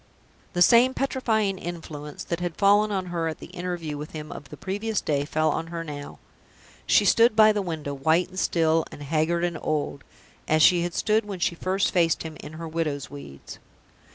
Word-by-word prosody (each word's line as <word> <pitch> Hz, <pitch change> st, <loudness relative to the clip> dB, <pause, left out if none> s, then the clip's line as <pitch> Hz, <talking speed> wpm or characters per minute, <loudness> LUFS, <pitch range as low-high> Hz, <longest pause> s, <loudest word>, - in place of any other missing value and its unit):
The 175 Hz, -, +5 dB
same 245 Hz, +6 st, +5 dB
petrifying 220 Hz, -8 st, 0 dB
influence 155 Hz, -4 st, -7 dB
that 170 Hz, -, -3 dB
had 175 Hz, -2 st, -4 dB
fallen 205 Hz, +1 st, +4 dB
on 190 Hz, -2 st, -1 dB
her 165 Hz, -1 st, -1 dB
at 160 Hz, -, -4 dB
the -, -, -12 dB
interview 175 Hz, -4 st, -4 dB
with 150 Hz, -, -8 dB
him 150 Hz, -1 st, -7 dB
of 145 Hz, -, -9 dB
the -, -, -10 dB
previous 205 Hz, +3 st, -2 dB
day 145 Hz, -2 st, -1 dB
fell 155 Hz, +1 st, +1 dB
on 165 Hz, -, -3 dB
her 165 Hz, 0 st, -5 dB
now. 145 Hz, -2 st, -8 dB, 0.7 s
She -, -, +5 dB
stood 230 Hz, -1 st, +5 dB
by 215 Hz, 0 st, +7 dB
the 210 Hz, -1 st, -1 dB
window, 160 Hz, -6 st, -4 dB
white 160 Hz, +6 st, +2 dB
and 185 Hz, 0 st, -6 dB
still, 165 Hz, -2 st, +2 dB
and 145 Hz, -, -9 dB
haggard 160 Hz, +3 st, 0 dB
and 175 Hz, -2 st, -1 dB
old 145 Hz, -2 st, -2 dB, 0.4 s
as 155 Hz, 0 st, +4 dB
she 175 Hz, 0 st, +6 dB
had 175 Hz, 0 st, -3 dB
stood 220 Hz, +1 st, +2 dB
when 200 Hz, -2 st, -5 dB
she 175 Hz, -, 0 dB
first 185 Hz, +3 st, 0 dB
faced 170 Hz, -3 st, +2 dB
him 160 Hz, -1 st, -7 dB
in 150 Hz, -, -9 dB
her 165 Hz, +1 st, -7 dB
widow's 155 Hz, -4 st, -3 dB
weeds. 140 Hz, -, -10 dB
170 Hz, 200 wpm, -25 LUFS, 155-195 Hz, 0.7 s, by